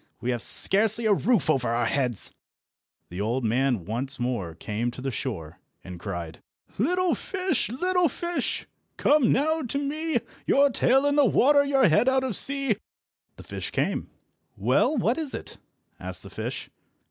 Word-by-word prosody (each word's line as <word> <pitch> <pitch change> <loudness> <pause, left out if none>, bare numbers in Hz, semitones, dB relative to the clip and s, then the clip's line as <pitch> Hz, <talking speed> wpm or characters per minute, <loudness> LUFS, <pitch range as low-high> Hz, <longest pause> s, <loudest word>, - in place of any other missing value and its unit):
We 125 - -2
have 120 -2 -2
scarcely 220 - +3
a 215 - +5
roof 205 - +1
over 125 -3 +1
our 120 +1 0
heads." 120 -3 +1 0.8
The 90 +3 -5
old 120 +4 -1
man 120 -4 +1
once 130 +6 0
more 115 -10 -3
came 110 +7 -3
to 120 - -9
the 135 +1 -3
shore, 95 - -5 0.2
and 90 -2 -9
cried— 85 -4 -6 0.4
"Little 360 - +2
fish, 370 - -1
little 360 +7 +1
fish, 345 +6 -3 0.3
come 290 -5 +3
now 315 +3 +1
to 260 +1 -3
me, 305 +3 -1 0.3
Your 280 0 +4
tail 265 +3 +3
in 285 0 +2
the 290 - +6
water, 285 +3 +4
your 270 -4 +3
head 180 +11 +4
out 265 0 +2
of 255 -6 -1
sea!" 275 -3 +1 0.6
The - - -12
fish - - -5
came. - - -2 0.5
"Well, 305 - +2
what 235 +5 +1
is 305 -4 -4
it?" - - -8 0.4
asked - - -7
the - - -11
fish. - - -5
220 Hz, 165 wpm, -26 LUFS, -, 0.8 s, the